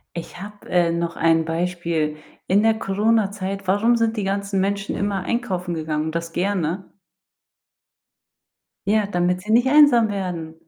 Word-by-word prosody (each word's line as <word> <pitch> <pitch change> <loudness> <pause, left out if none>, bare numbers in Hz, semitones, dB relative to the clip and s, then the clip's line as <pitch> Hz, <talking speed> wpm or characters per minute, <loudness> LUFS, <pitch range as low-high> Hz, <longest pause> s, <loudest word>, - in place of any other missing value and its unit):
Ich 170 +1 -7
habe, 205 +1 -11
äh, 175 -1 +3
noch 170 0 -2
ein 165 0 +3
Beispiel. 165 -2 -2 0.3
In 200 +3 +3
der 225 0 +4
Coronazeit, 200 -2 0
warum 225 +5 +3
sind 230 0 0
die 210 - -2
ganzen 200 0 -2
Menschen 200 +1 -1
immer 200 -2 -1
einkaufen 185 -7 -2
gegangen 155 -1 -2
und 160 - -4
das 170 0 -4
gerne? 185 -1 -2 2.0
Ja, 210 +1 +2
damit 180 -1 0
sie 210 - -7
nicht 240 +3 +4
einsam 280 -6 +6
werden. 180 -5 -4
195 Hz, 145 wpm, -22 LUFS, 170-205 Hz, 2.0 s, einsam